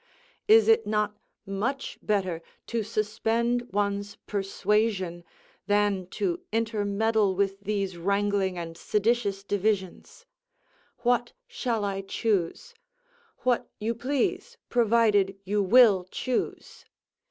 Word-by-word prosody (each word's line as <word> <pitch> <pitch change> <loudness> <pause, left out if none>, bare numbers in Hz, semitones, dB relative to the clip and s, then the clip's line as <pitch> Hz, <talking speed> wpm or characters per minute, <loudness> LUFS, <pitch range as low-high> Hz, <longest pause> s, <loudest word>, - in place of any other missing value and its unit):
Is 440 +1 +7
it 450 0 +4
not 210 -1 0 0.3
much 220 +8 -3
better 185 -5 -1 0.2
to 230 -1 -2
suspend 225 +3 -1
one's 200 0 -1
persuasion 195 -3 0 0.4
than 205 -3 +1
to 350 - -2
intermeddle 215 -2 +1
with 195 0 0
these 200 -3 -2
wrangling 200 0 0
and 165 -1 -6
seditious 210 0 0
divisions: 205 - -2 0.8
"What 240 0 +1
shall 240 - -2
I 195 -1 -2
choose?" 195 -3 -1 0.7
"What 250 -2 +1
you 220 +2 -1
please, 280 - -2
provided 215 -4 +3
you 205 +2 0
will 200 -3 +6
choose." 255 +4 -3
210 Hz, 100 wpm, -27 LUFS, 195-235 Hz, 0.8 s, Is